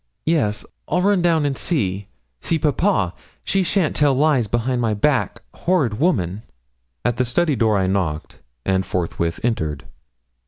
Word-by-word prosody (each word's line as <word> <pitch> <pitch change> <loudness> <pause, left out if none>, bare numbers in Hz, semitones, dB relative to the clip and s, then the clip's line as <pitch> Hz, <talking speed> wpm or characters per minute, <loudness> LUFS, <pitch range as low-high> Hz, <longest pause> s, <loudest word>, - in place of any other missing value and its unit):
'Yes, 135 -11 +1 0.2
I'll 180 - +1
run 200 -2 +3
down 165 -3 +2
and 140 -1 0
see 100 - -1 0.3
see 165 - 0
papa; 150 - +1 0.3
she 195 - +1
shan't 180 -2 +1
tell 145 -2 +3
lies 140 -5 +2
behind 120 +3 0
my 110 -2 +1
back, 135 +5 0
horrid 145 -12 0
woman!' 105 - +1 0.6
At 120 -1 +1
the 125 - +2
study 150 +5 +1
door 110 -3 +2
I 95 - +1
knocked, 90 -5 -2 0.3
and 95 0 +1
forthwith 85 -2 -2
entered. 80 - -1
120 Hz, 150 wpm, -21 LUFS, 95-160 Hz, 0.6 s, run